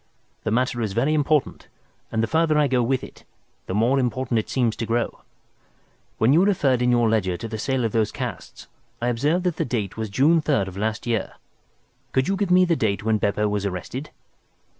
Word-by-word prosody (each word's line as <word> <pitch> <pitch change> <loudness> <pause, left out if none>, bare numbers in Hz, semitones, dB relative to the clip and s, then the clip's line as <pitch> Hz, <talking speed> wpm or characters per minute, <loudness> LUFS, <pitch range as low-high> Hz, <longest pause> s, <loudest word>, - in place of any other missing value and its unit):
The - - +1
matter 120 +1 0
is 105 -4 -2
very 130 +8 +1
important, 150 -1 0 0.4
and 110 0 0
the - - +1
farther 160 -1 +2
I 150 -1 +4
go 125 -2 +2
with 130 +2 0
it, - - -12 0.4
the 95 - -3
more 120 +6 +3
important 125 -2 0
it 110 - -5
seems 120 -4 +1
to 115 - -2
grow. 120 +1 -1 1.0
When 115 +5 +4
you 170 +4 +5
referred 140 -11 +2
in 125 - +2
your 120 -1 +3
ledger 100 -5 +1
to 115 - -6
the 110 -1 -6
sale 130 0 0
of 115 - -1
those 110 -1 +1
casts - - -6 0.3
I 120 - 0
observed 150 +9 +1
that 180 -3 -1
the - - +1
date 110 -6 -3
was 110 -1 -3
June 150 +10 +3
3rd 140 -11 +1
of 90 - -12
last 110 +3 -2
year. 115 -2 -1 0.8
Could 130 0 +2
you 195 - +1
give 200 -1 -1
me 180 0 +5
the 170 -2 +2
date 110 -7 -1
when 110 -1 +1
Beppo 105 +1 +1
was 105 -1 -1
arrested?" 100 - -5
120 Hz, 210 wpm, -23 LUFS, 110-145 Hz, 1.0 s, you